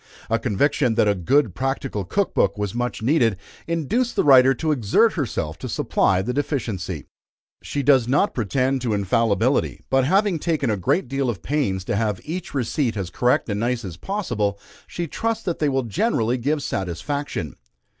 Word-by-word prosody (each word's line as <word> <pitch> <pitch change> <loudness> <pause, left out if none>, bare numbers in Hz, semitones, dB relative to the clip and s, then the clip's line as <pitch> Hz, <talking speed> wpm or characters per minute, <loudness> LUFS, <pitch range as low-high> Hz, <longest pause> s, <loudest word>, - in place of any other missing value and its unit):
A 115 - +2
conviction 120 +2 +1
that 105 - +3
a 105 - +4
good 105 - +2
practical 135 -3 -2
Cook 195 - -1
Book 100 +1 +2
was 105 -1 -2
much 120 -2 -3
needed, 115 - +2 0.3
induced 170 - 0
the - - +2
writer 135 -2 +6
to 155 +4 -1
exert 145 - +3
herself 85 - -3
to - - -6
supply 95 0 +1
the 125 +5 -2
deficiency. 105 - -3 0.6
She 145 - -3
does 130 -3 +4
not 145 +10 +2
pretend 130 +4 0
to 115 -4 0
infallibility, 115 +5 +1
but 135 0 +4
having 195 +2 +2
taken 150 -7 0
a - - +1
great 105 - 0
deal 135 0 -1
of 95 -8 -4
pains 125 - -1
to - - -1
have 105 -2 0
each 165 -1 -6
receipt 125 -2 -1
as 95 -3 -4
correct 125 0 +1
and 105 -2 -2
nice 120 0 -1
as 90 -4 -6
possible, 105 - -2 0.3
she 175 - -4
trusts 225 +7 -2
that 175 - -2
they 150 - +2
will 135 -1 0
generally 120 - 0
give 145 +4 -1
satisfaction. 95 - -3
125 Hz, 175 wpm, -22 LUFS, 105-145 Hz, 0.6 s, writer